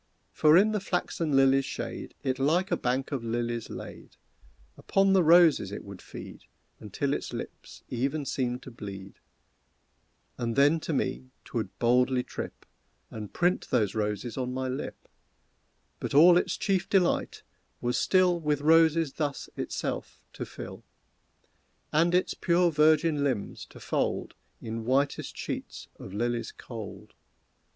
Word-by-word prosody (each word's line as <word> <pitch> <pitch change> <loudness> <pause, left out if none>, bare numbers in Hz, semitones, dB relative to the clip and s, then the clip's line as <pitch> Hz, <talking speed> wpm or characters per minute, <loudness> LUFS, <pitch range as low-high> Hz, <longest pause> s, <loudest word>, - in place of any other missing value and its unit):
For 155 +1 +5
in 210 +3 +5
the 210 - 0
flaxen 175 -4 -2
lilies' 135 0 +5
shade 135 - -6
It 130 -1 -1
like 170 +8 +2
a - - +4
bank 130 +3 -1
of 135 -5 -2
lilies 115 0 -2
laid; - - -9 0.6
Upon 195 0 +2
the 190 -2 +5
roses 165 - +5
it 100 - -6
would 100 -2 -10
feed - - -10 0.3
Until - - -2
its - - -4
lips - - -8
even 135 +4 -2
seemed 125 -2 -2
to - - -10
bleed, 100 -4 -9 1.2
And 115 -1 -2
then 145 +4 +4
to 160 - -4
me 130 -1 -2 0.2
'twould 115 -2 -4
boldly 125 +1 +3
trip, - - -7 0.5
And 105 -2 -7
print 175 +1 +1
those 110 -6 +1
roses 105 +2 -2
on 125 -1 -2
my 130 +1 -2
lip, 130 +1 -5 0.9
But - - -4
all 170 +4 +8
its 175 - +1
chief 190 -2 0
delight 190 -3 +1 0.4
was 120 0 -1
still 185 -2 +3
With 150 -3 0
roses 160 -1 +4
thus 145 -3 -3
itself - - -4
to - - -6
fill, - - -9 1.1
And 170 +3 +3
its 180 - +2
pure 175 0 +2
virgin 155 0 +3
limbs 130 -8 -2
to - - -14
fold - - -2 0.3
In 115 0 -4
whitest 135 +4 0
sheets - - -6
of 95 - -9
lilies 115 +2 -2
cold. 110 -5 -9
135 Hz, 145 wpm, -28 LUFS, 120-165 Hz, 1.2 s, all